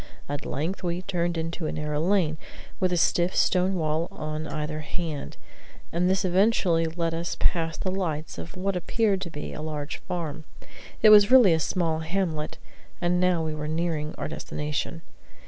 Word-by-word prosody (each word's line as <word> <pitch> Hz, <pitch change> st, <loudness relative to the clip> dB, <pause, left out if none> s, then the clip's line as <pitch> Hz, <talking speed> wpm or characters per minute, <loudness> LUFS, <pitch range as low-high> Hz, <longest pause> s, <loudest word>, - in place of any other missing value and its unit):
At 145 Hz, 0 st, -4 dB
length 165 Hz, +7 st, -2 dB
we 175 Hz, 0 st, -2 dB
turned 175 Hz, -3 st, -1 dB
into 165 Hz, 0 st, -3 dB
a -, -, -2 dB
narrow 150 Hz, -1 st, -2 dB
lane, 170 Hz, -3 st, +2 dB, 0.4 s
with 185 Hz, -1 st, +2 dB
a 175 Hz, -, +1 dB
stiff 175 Hz, +2 st, +2 dB
stone 185 Hz, +1 st, +3 dB
wall 160 Hz, 0 st, 0 dB
on 155 Hz, +1 st, -5 dB
either 155 Hz, 0 st, -3 dB
hand, 155 Hz, -1 st, -5 dB, 0.6 s
and 175 Hz, +2 st, +2 dB
this 190 Hz, +1 st, +2 dB
eventually 185 Hz, -3 st, +3 dB
led 165 Hz, 0 st, -1 dB
us 170 Hz, +1 st, -3 dB
past 165 Hz, -2 st, +1 dB
the 185 Hz, -, -1 dB
lights 160 Hz, -5 st, -3 dB
of 175 Hz, -, -8 dB
what 195 Hz, +1 st, -1 dB
appeared 195 Hz, +2 st, +1 dB
to 175 Hz, -, -4 dB
be 150 Hz, -2 st, -6 dB
a -, -, -6 dB
large 150 Hz, -2 st, -4 dB
farm; 160 Hz, -3 st, -5 dB, 0.6 s
it 215 Hz, -, +9 dB
was 205 Hz, 0 st, +8 dB
really 250 Hz, -9 st, +8 dB
a 160 Hz, -, +2 dB
small 160 Hz, 0 st, 0 dB
hamlet; 160 Hz, -2 st, -2 dB, 0.4 s
and 175 Hz, 0 st, +1 dB
now 180 Hz, -3 st, +2 dB
we 155 Hz, -, -2 dB
were 150 Hz, 0 st, -4 dB
nearing 160 Hz, -1 st, -1 dB
our -, -, -3 dB
destination. 150 Hz, +2 st, -4 dB
165 Hz, 175 wpm, -26 LUFS, 155-185 Hz, 0.6 s, it